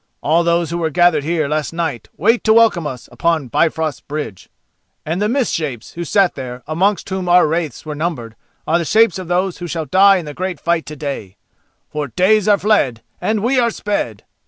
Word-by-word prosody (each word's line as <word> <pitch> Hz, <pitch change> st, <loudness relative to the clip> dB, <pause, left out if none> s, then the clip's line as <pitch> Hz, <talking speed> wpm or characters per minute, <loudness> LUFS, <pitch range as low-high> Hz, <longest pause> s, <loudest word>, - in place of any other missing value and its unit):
All 165 Hz, +3 st, +3 dB
those 170 Hz, -1 st, +1 dB
who 170 Hz, -, -2 dB
were 160 Hz, -1 st, 0 dB
gathered 175 Hz, -2 st, +3 dB
here 160 Hz, -1 st, 0 dB
last 150 Hz, +1 st, -2 dB
night 160 Hz, -8 st, -3 dB
wait 225 Hz, +8 st, +2 dB
to 220 Hz, -, +5 dB
welcome 220 Hz, -8 st, +4 dB
us 130 Hz, -4 st, -7 dB
on 165 Hz, -6 st, +1 dB
Bifrost 160 Hz, +3 st, 0 dB
Bridge. 145 Hz, -10 st, -6 dB, 0.6 s
And 170 Hz, +5 st, -2 dB
the 210 Hz, -, +1 dB
mist 260 Hz, 0 st, 0 dB
shapes 135 Hz, -8 st, -4 dB
who 170 Hz, -, -5 dB
sat 190 Hz, +2 st, +2 dB
there, 125 Hz, -1 st, -7 dB
amongst 185 Hz, +5 st, 0 dB
whom 190 Hz, -2 st, -3 dB
our 180 Hz, +1 st, +6 dB
wraiths 160 Hz, -4 st, -2 dB
were 155 Hz, -, -4 dB
numbered, 145 Hz, -8 st, -4 dB, 0.3 s
are 165 Hz, +2 st, +2 dB
the -, -, -1 dB
shapes 215 Hz, +2 st, +3 dB
of 185 Hz, -, -7 dB
those 180 Hz, +1 st, -1 dB
who 175 Hz, -, -5 dB
shall 165 Hz, -1 st, -3 dB
die 195 Hz, +6 st, +5 dB
in 175 Hz, -, -5 dB
the 150 Hz, -, -7 dB
great 185 Hz, 0 st, -4 dB
fight 170 Hz, -1 st, 0 dB
to 150 Hz, -, -7 dB
day. 140 Hz, -10 st, -6 dB, 0.5 s
For 150 Hz, -1 st, -3 dB
days 190 Hz, -, +2 dB
are 205 Hz, -1 st, +5 dB
fled 145 Hz, -, +1 dB, 0.2 s
and 215 Hz, -1 st, 0 dB
we 255 Hz, +2 st, +2 dB
are 235 Hz, -1 st, +3 dB
sped!" 205 Hz, -, -3 dB
170 Hz, 205 wpm, -18 LUFS, 150-190 Hz, 0.6 s, our